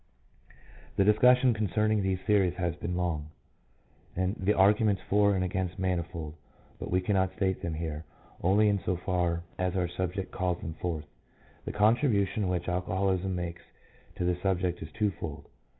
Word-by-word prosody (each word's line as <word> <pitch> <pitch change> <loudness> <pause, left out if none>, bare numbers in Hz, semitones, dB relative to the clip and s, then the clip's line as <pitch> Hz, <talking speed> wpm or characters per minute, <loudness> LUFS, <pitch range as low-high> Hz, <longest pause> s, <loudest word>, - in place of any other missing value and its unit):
The 100 - +4
discussion 125 +5 +5
concerning 110 0 +1
these 95 -1 0
theories 95 -4 +2
has 85 -2 -1
been 90 0 -4
long, 80 -4 -2 0.9
and 95 +3 0
the 100 +3 +1
arguments 100 0 +3
for 100 0 +4
and 95 - 0
against 95 -1 -2
manifold, 85 -4 -2 0.5
but - - -5
we 90 +1 +2
cannot 95 -1 +1
state 95 -3 0
them 85 -4 -3
here, 80 -1 -4 0.4
only 100 +4 +4
in 100 -1 +2
so 90 - 0
far 85 -2 -1 0.2
as 90 0 0
our 90 -2 +1
subject 90 +2 -3
calls 90 -1 -1
them 80 - -5
forth. 80 -2 -4 0.6
The - - -3
contribution 105 -3 +2
which 90 -1 -2
alcoholism 95 +1 0
makes 85 -1 -4 0.5
to 90 - -2
the 90 0 +1
subject 90 -2 0
is 80 - -7
twofold. 95 -8 -3
95 Hz, 155 wpm, -29 LUFS, 90-100 Hz, 0.9 s, discussion